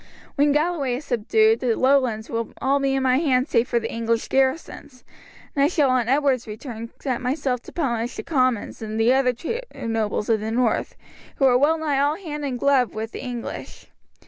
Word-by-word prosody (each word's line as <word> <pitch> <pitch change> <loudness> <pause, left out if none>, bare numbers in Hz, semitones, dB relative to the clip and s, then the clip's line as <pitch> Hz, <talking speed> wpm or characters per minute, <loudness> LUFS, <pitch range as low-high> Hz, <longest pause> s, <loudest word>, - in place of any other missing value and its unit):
When 290 0 +3
Galloway 295 -4 0
is 280 +4 -7
subdued 435 - +2
the 240 -3 +1
lowlands 255 -5 +2
will 230 0 -2
be - - -19
all 275 +1 +1
in 270 -1 +1
my 255 0 +3
hands 265 -5 +1
save 230 +2 +3
for 240 - +1
the 225 - -5
English 230 0 -1
garrisons, 265 -1 -1 0.5
and 280 - +3
I - - +5
shall 295 -5 +2
on 245 -2 +1
Edward's 270 -3 +2
return 230 +1 -7
set 255 -4 -2
myself 255 -1 -1
to - - -12
punish 240 -7 -2
the - - -5
Comyns 255 -9 0
and 220 0 -4
the 230 +3 +4
other 265 -1 +3
traitor 460 - -6
nobles 220 -2 -1
of 225 -2 +2
the 215 +1 -4
north, 235 0 0 0.4
who 270 - +2
are 255 -2 +5
well 295 +6 +3
nigh 300 -3 0
all 290 +2 +2
hand 305 -5 -6
and 265 -3 -2
glove 270 -3 +2
with 220 +1 -4
the - - -7
English. 245 -2 -7
255 Hz, 200 wpm, -23 LUFS, 230-285 Hz, 0.5 s, I